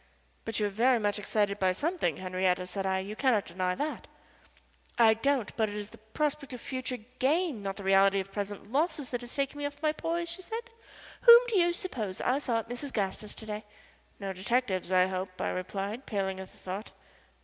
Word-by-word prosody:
"But 225 -1 -2
you 210 - +2
are - - +1
very 240 +5 +4
much 205 -1 0
excited 205 -1 0
by 185 -1 +3
something, 295 - 0
Henriette," 185 0 0
said 195 +1 -2
I. 190 0 +2
"You 195 +3 -4
cannot 235 -5 +2
deny 180 +1 -1
that." 300 +6 -3 0.9
"I 225 -2 +7
don't 250 -1 0
but 220 -2 +1
it 205 - -6
is 210 0 -5
the - - -14
prospect 275 +5 -2
of 250 - -6
future 255 0 -4 0.2
gain, 300 - +2
not 195 -1 -3
the 200 - -8
reality 195 +1 +5
of 195 0 -5
present 205 +1 -5
losses, 295 -1 0
that 245 -1 -2
has 240 0 -6
taken 280 +1 -1
me 290 - -2
off 290 0 -10
my 305 - +4
poise," 335 +2 -2
she 340 +2 -4
said. 465 +5 -6 0.5
"Whom 470 -1 +11
do 425 -5 +3
you 345 0 +4
suppose 235 - -4
I 255 +3 +2
saw 245 -5 0
at 225 - -3
Mrs. 255 +3 -4
Gaster's 205 -1 -3
to 220 - -10
day?" 210 0 -4 0.6
"No 195 -2 -3
detectives, 190 -1 0
I 185 0 +5
hope," 185 0 -4
I - - 0
replied, 200 +6 -4
paling 190 -3 -1
at 190 - -8
the - - -20
thought. 190 +4 -6
215 Hz, 210 wpm, -30 LUFS, 195-275 Hz, 0.9 s, Whom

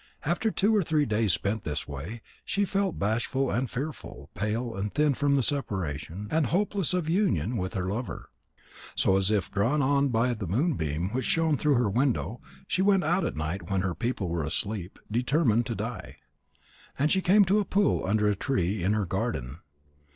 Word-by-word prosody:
After 175 +8 +1
two 215 +1 +2
or 210 - +4
three 155 -3 +1
days 110 -3 +1
spent 100 +1 -1
in - - -4
this 75 0 -3
way, 80 - -7 0.2
she 200 0 0
felt 195 -2 -1
bashful 120 +6 0
and 125 +1 -1
fearful, 135 - -6
pale 115 +3 -2
and 100 +1 -3
thin 150 -1 +2
from 140 +1 +1
the 135 - +2
separation, 95 - -2
and 160 -4 +2
hopeless 195 - +1
of 175 -4 -1
union 170 - +1
with 95 -3 -3
her 95 - -1
lover. 115 +6 -5 0.6
So, 95 - +3
as 95 0 +3
if 105 -3 0
drawn 120 +9 +1
on 140 +1 +3
by 120 0 +1
the 105 -5 -5
moonbeam 90 - 0
which 130 +2 -2
shone 165 -2 +2
through 145 0 +2
her 120 -2 +2
window, 120 +1 0 0.2
she 185 - 0
went 195 -1 +4
out 175 +5 +1
at - - -2
night 80 +7 -4
when 95 -2 +1
her 95 -2 -1
people 105 +2 -2
were 85 -1 -1
asleep, 95 +4 -2
determined 120 -1 +2
to - - -2
die. - - -6 0.8
And 145 +3 +2
she 190 - +3
came 200 +3 +5
to 200 +3 +3
a - - +2
pool 200 +1 +1
under 105 +2 +2
a 105 - +2
tree 95 -3 -1
in 100 +4 +2
her 105 -2 0
garden. 85 - -3
120 Hz, 195 wpm, -28 LUFS, 95-150 Hz, 0.8 s, came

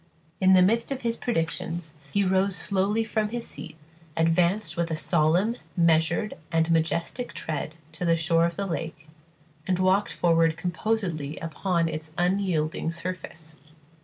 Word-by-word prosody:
In 190 0 +5
the 185 -1 +7
midst 230 +7 +2
of 265 -1 -2
his 230 -1 0
predictions 165 -6 -2 0.2
he 200 - +2
rose 190 +1 +2
slowly 200 +5 +1
from 215 -1 -1
his 235 +1 -4
seat, 160 -2 -5 0.4
advanced 170 +5 +2
with 170 -1 -1
a 160 - -1
solemn, 170 +8 +2 0.2
measured, 165 +5 +3 0.2
and 165 0 +2
majestic 170 +9 0
tread 155 0 -4 0.2
to 160 +2 -6
the 165 -1 +3
shore 165 0 +3
of 170 - -5
the 200 - -2
lake, 160 -3 -5 0.6
and 185 -1 +2
walked 185 +2 +2
forward 165 -1 +2
composedly 175 -4 -2
upon 170 +1 -1
its 155 -1 -5
unyielding 175 -4 0
surface. 165 -3 -6
170 Hz, 145 wpm, -26 LUFS, 165-195 Hz, 0.6 s, the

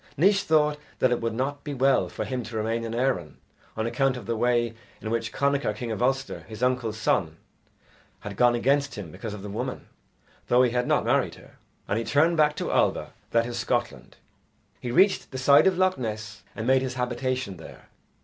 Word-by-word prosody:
Naois 195 +6 +4
thought 150 -5 +2 0.2
that 130 - +2
it 120 - 0
would 115 -1 -2
not 140 +3 -2
be 145 -2 -5
well 135 +1 +3
for - - -4
him 130 -1 -3
to 110 -1 -6
remain 115 +2 -1
in 115 0 -4
Erin 120 - -1 0.4
on 110 - -1
account 130 +2 +1
of 120 - -9
the 115 +2 -1
way 120 0 +1 0.3
in 110 - -5
which 115 0 -1
Connachar, 140 -6 0
king 115 +1 -5
of 110 - -3
Ulster, 135 +2 0
his 110 +2 -7
uncle's 125 -4 0
son, 80 -7 0 0.8
had 105 -1 -7
gone 120 +3 +4
against 140 +4 +1
him 95 -6 -7
because 105 +5 -6
of 100 - -10
the - - -6
woman, 100 - -4 0.6
though 125 +1 +5
he 125 - +2
had 125 0 0
not - - +2
married - - +1
her; - - -17 0.3
and 105 - 0
he - - -2
turned 160 +7 +3
back 150 -1 +3
to - - -3
Alba, - - +1 0.2
that 115 0 +2
is, 120 0 -4
Scotland. 110 - -2 0.6
He 125 - -5
reached 190 +9 +3
the 130 - -6
side 140 +7 +6
of 185 -2 +2
Loch 185 -2 +2
Ness 110 -2 -5
and 110 - -4
made 130 +1 +4
his 130 -1 -3
habitation 125 -4 -2
there. 80 - -13
125 Hz, 205 wpm, -26 LUFS, 110-135 Hz, 0.8 s, side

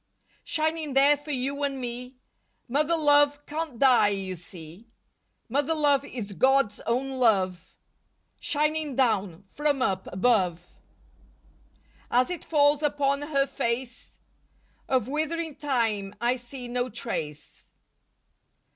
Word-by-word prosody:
Shining 315 -2 -2
there 280 +2 +6
for 290 +1 -13
you 275 +1 -2
and 275 -2 -1
me, 250 +1 -6 0.5
Mother 300 +6 +1
love 290 -1 +3
can't 305 -4 -4
die, 255 -4 +5
you 195 -2 -2
see. 175 +3 -12 0.6
Mother 285 +6 0
love 290 -3 +3
is 225 -7 -7
God's 260 -2 +2
own 260 +3 -1
love. 185 -6 +1 0.6
Shining 300 -1 -1
down 205 -8 0
from 290 -3 0
up 190 -5 -1
above. 185 -4 +1 1.4
As 250 +6 +2
it 355 - -5
falls 290 -1 +3
upon 285 -1 +1
her 285 -2 +1
face 235 -1 -4 0.7
Of 255 -4 +1
withering 315 +2 -2
time 225 -8 -1
I 240 +2 +1
see 250 0 -8
no 245 +1 -2
trace. 155 -10 -6
260 Hz, 115 wpm, -26 LUFS, 225-290 Hz, 1.4 s, there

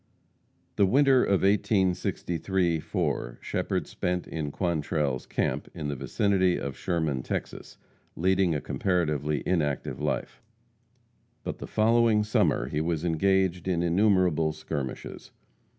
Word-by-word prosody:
The 100 - +5
winter 135 +3 +4
of 100 -2 +1
1863 95 -3 +1
4, - - -2
Shepherd - - -2
spent 90 0 -2
in 80 -3 -3
Quantrell's 75 -5 -1
camp, - - -2
in 75 - -4
the 70 - -2
vicinity 95 +5 +1
of 70 -2 -4
Sherman, 80 -7 -1
Texas, - - -5 0.4
leading 95 -1 +2
a 75 - -2
comparatively 75 -6 -1
inactive 75 -6 -1
life; - - -3 1.0
but - - -5
the - - -6
following 110 0 +3
summer 105 - +1
he 75 +3 -2
was 80 0 -1
engaged 90 +1 +1
in 85 -2 +1
innumerable 90 -4 +2
skirmishes. 75 -4 -6
85 Hz, 120 wpm, -27 LUFS, 75-95 Hz, 1.0 s, The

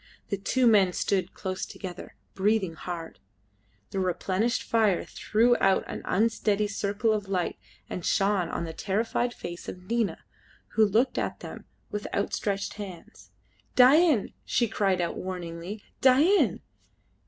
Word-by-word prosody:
The 200 - -1
two 255 +6 +1
men 200 -5 +5
stood 190 -1 -1
close 185 0 -4
together, 180 -3 -8 0.2
breathing 195 -3 +1
hard. 165 0 -7 0.7
The 195 - -2
replenished 190 +5 0
fire 215 -5 +2
threw 235 +3 +2
out 195 -1 +3
an - - -6
unsteady 210 -1 +1
circle 205 +2 0
of 205 -2 -2
light 180 -3 -1 0.3
and 180 - -5
shone 195 -3 +1
on - - -3
the 165 -1 -5
terrified 225 +7 -1
face 175 -6 -7
of 180 - -9
Nina, 230 -1 0 0.5
who 220 - +3
looked 230 +6 +2
at - - -3
them - - -9 0.3
with 210 0 -3
outstretched 200 0 -1
hands. 185 -4 -10 0.5
"Dain!" 270 - +5
she 240 - +1
cried 195 -3 +1
out 170 - -2
warningly, 180 +2 -6 0.2
"Dain!" 290 +10 +4
200 Hz, 135 wpm, -27 LUFS, 185-225 Hz, 0.7 s, men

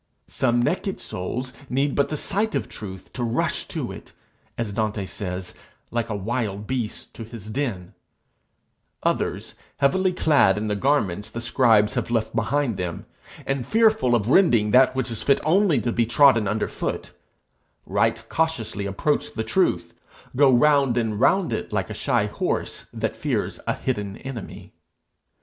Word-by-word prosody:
Some 120 0 +1
naked 185 +7 -1
souls 125 +8 -5 0.2
need 135 +2 +1
but 140 - +2
the 150 - -2
sight 210 +8 -1
of - - -1
truth 95 -3 -9
to 125 - -3
rush 115 0 -1
to - - -4
it, - - -11 0.4
as 115 -4 -3
Dante 105 -1 -1
says, 95 -1 -5 0.4
like 115 -1 -1
a 105 - -2
wild 105 0 -2
beast 120 -2 -4
to 115 - -8
his 110 -2 -9
den; 110 -10 -3 1.1
others, - - -1 0.2
heavily 185 +7 +2
clad 150 - +3
in 105 - -2
the 105 -1 0
garments 105 -6 0
the 115 - -6
scribes 115 -3 +3
have - - -2
left 115 -1 -1
behind 120 0 0
them, 90 -2 -4 0.4
and 135 -3 -2
fearful 220 - +3
of 110 -3 0
rending 120 - +4
that 130 +2 +5
which 130 -2 -1
is 115 - -4
fit 140 - +3
only 180 0 +4
to 120 - -1
be 115 -1 +1
trodden 120 -4 +5
underfoot, 105 +2 -3 0.7
right - - 0
cautiously 120 -11 -1
approach 100 +10 0
the 110 - -1
truth, 180 +12 0 0.4
go 140 0 +6
round 135 -1 +4
and 110 -3 0
round 190 - +3
it - - -4
like - - -1
a - - -3
shy - - +1
horse - - -3
that - - -3
fears - - -2
a - - +1
hidden 105 -6 -3
enemy. 130 -6 -8
120 Hz, 160 wpm, -24 LUFS, 105-140 Hz, 1.1 s, go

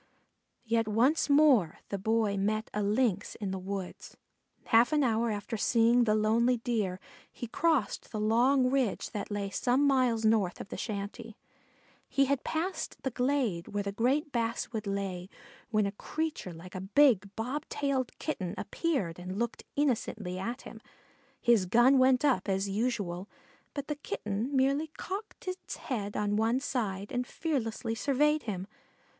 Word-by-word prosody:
Yet 225 -1 +1
once 250 +10 +2
more 280 - +5
the 200 - -3
Boy 220 0 +1
met 215 +3 -1
a 210 - -1
Lynx 205 -1 +1
in 200 -3 -4
the 190 - -3
woods. 190 0 -6 0.5
Half 230 +4 +5
an 295 -1 +3
hour 230 -1 +2
after 215 +2 -3
seeing 235 +2 +4
the 215 -1 +3
lonely 230 +3 +3
Deer 215 -6 -1 0.3
he - - -6
crossed 275 -2 0
the 215 - -3
long 250 +4 +3
ridge 260 -7 0
that 205 - -4
lay 205 -1 -3
some 255 +7 +2
miles 250 -5 +2
north 215 -5 +2
of - - -8
the - - -5
shanty. 215 +1 -5 0.7
He 275 - +3
had 275 0 0
passed 340 +4 -3
the 265 - -1
glade 245 -9 0
where 205 0 -2
the 200 - -3
great 265 +8 +1
basswood 230 -2 -2
lay 195 -2 -3 0.4
when 215 -3 +2
a 200 - -1
creature 310 - -4
like 175 +2 -11
a 185 - -5
big 205 0 +4
bob 260 +7 -3
tailed 270 -3 -1
Kitten 190 - -3
appeared 225 - -2
and 185 +2 -5
looked 235 +1 -3
innocently 220 -9 -1
at 235 +7 -4
him. 220 - -10 0.6
His 225 -6 +3
gun 240 +7 +5
went 260 +1 +4
up, 260 -7 +2
as 195 +1 0
usual, 200 -3 -2 0.5
but 285 -1 -4
the 300 - -3
Kitten 215 +1 -3
merely 275 +4 +2
cocked 400 +1 -6
its 370 0 -5
head 205 -7 -4
on 205 0 0
one 225 +3 +2
side 205 -8 -3
and 250 -1 -1
fearlessly 235 -7 -2
surveyed 295 +5 +2
him. 190 -4 -4
225 Hz, 160 wpm, -30 LUFS, 200-265 Hz, 0.7 s, more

